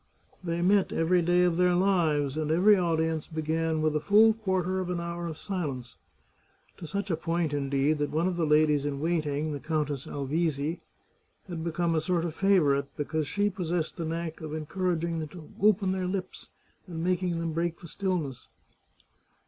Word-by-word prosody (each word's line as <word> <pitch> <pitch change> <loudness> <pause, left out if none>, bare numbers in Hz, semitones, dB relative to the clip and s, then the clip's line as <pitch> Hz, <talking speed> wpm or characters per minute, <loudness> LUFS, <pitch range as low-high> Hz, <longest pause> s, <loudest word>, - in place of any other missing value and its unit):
They 170 0 -1
met 195 +1 +3
every 175 +2 +2
day 175 +1 +3
of 175 -2 +2
their 180 0 +3
lives, 160 -7 +2
and 155 -1 -2
every 185 +6 +5
audience 160 -3 0
began 160 0 -1
with 155 -1 +1
a - - +2
full 215 +8 +5
quarter 190 -4 -1
of 185 -1 -3
an 180 -1 -1
hour 170 0 -4
of 160 -2 -6
silence 145 - -4 0.4
— - - -37
to 165 - -8
such 200 +2 -3
a - - +2
point 165 -1 -1
indeed, 140 +1 +1
that 145 - 0
one 160 +4 0
of 185 - -1
the 165 -2 0
ladies 150 -1 +4
in 145 -1 -2
waiting, 155 -2 -1
the 145 - -4
Coun 155 +1 0
tess 140 -2 -5
Alvizi, 150 +2 -1 0.7
had 170 -3 -5
become 170 0 0
a 160 - +1
sort 170 +1 0
of 165 - -3
favourite 155 -8 +3
because 150 0 -2
she 205 +6 +1
possessed 175 -3 -2
the 165 - -3
knack 165 0 -4
of 155 -1 -5
encouraging 170 +1 -1
them 155 - -4
to 155 0 -12
open 200 -2 +4
their 185 -1 -1
lips, 185 0 -5 0.4
and 165 -2 -5
making 180 -1 0
them 165 -1 -2
break 170 +1 -1
the 170 - -11
stillness. 170 -8 -3
165 Hz, 190 wpm, -28 LUFS, 155-180 Hz, 0.7 s, every